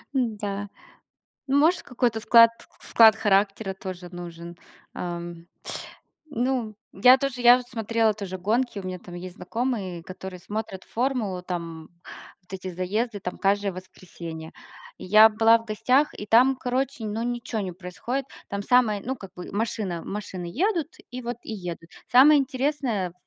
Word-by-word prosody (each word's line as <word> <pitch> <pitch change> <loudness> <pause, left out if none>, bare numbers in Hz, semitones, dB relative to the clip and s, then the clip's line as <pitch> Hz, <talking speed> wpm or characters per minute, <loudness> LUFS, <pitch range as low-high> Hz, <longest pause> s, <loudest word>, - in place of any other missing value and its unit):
Н-да. 205 -5 -2 0.8
Ну, 275 +1 +2
может, 320 +5 +3
какой-то 235 -2 -1
склад 230 +1 +7 0.3
склад 220 -2 +6
характера 200 -1 +1
тоже 185 -2 -8
нужен, 170 -1 -9 0.4
ам. 170 -1 -6 0.9
Ну, 245 -4 -1 0.2
я 250 +7 +6
тоже, 265 -2 -2
я 245 0 +9
вот 250 -1 -8
смотрела 225 -2 +1
тоже 190 -3 -6
гонки, 225 +4 0
у - - -8
меня 185 0 -4
там 180 0 -13
есть 175 +1 -8
знакомые, 200 -3 -3
которые 185 0 -8
смотрят 205 0 -5
"Формулу", 225 -7 -2
там, 165 -3 -6 0.5
вот 180 - -22
эти 190 0 -5
заезды 205 +5 -2
там 180 -1 -5
каждое 200 0 +1
воскресенье. 170 -3 -9 0.5
И - - -9
я 215 +4 +8
была 225 +1 +5
в 225 - -14
гостях, 255 +7 +2
и 210 - -6
там, 250 +5 +5
короче, 255 -1 -2
ну, 215 +1 -3
ничё 240 -1 -3
не 190 -3 -4
происходит. 190 +9 -4 0.2
Там 200 0 -4
самое, 225 -4 +3
ну, 265 +2 -2
как 195 -6 -12
бы 180 - -8
машина 200 -5 -2
машины 195 -3 -6
едут, 345 - 0 0.2
и 250 +1 -6
вот 240 0 -4
и - - -6
едут. 175 -4 -7 0.2
Самое 285 +4 +8
интересное, 260 -7 -1
ф - - -19
210 Hz, 155 wpm, -25 LUFS, 185-245 Hz, 0.9 s, я